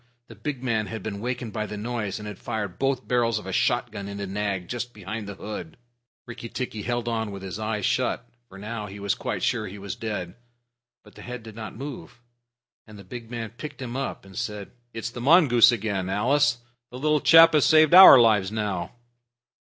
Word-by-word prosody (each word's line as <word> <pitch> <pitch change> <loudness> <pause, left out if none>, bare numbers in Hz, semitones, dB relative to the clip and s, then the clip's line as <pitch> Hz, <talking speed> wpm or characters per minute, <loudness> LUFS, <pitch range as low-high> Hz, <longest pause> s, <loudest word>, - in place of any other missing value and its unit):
The 115 - -11
big 130 +5 -5
man 110 -4 0
had 110 -1 -6
been 100 -2 -5
wakened 120 -1 -4
by 110 -1 -3
the 105 - -6
noise, 110 -2 -3
and 105 -1 -8
had 105 -3 -8
fired 100 -5 -4
both 135 -1 -1
barrels 115 -3 +1
of 105 - -7
a 95 - -5
shotgun 100 +2 0
into 100 0 -5
Nag 95 -2 -3
just 120 -1 -5
behind 105 +1 -6
the 100 - -7
hood. 95 -6 -7 0.5
Rikki 115 -1 -8
tikki 120 -4 -5
held 120 +2 -2
on 110 -2 -1
with 100 -1 -8
his 95 +2 -6
eyes 110 -2 -2
shut, - - 0 0.2
for 95 - -13
now 105 +1 -6
he 100 +1 -10
was 100 0 0
quite - - -4
sure 110 -3 0
he 95 +2 -9
was 100 -1 -6
dead. 105 -6 -5 0.7
But - - -18
the - - -13
head 125 -1 -7
did 110 -2 -11
not 110 -1 -8
move, 135 -1 -8 0.7
and 110 -1 -13
the 100 - -11
big 115 +4 -9
man 115 -2 -5
picked 150 +6 -9
him 125 -2 -6
up 135 -6 -4
and 95 -1 -14
said, 105 0 -5 0.2
"It's 115 0 -5
the 120 - -7
mongoose 130 -5 +6
again, 100 -5 -2
Alice. 135 +7 +2 0.3
The 125 - -9
little 150 +2 +1
chap 165 0 +8
has 150 -3 +4
saved 155 0 +5
our 185 -7 +11
lives 105 -4 +3
now." 100 -5 -3
110 Hz, 205 wpm, -25 LUFS, 100-120 Hz, 0.7 s, our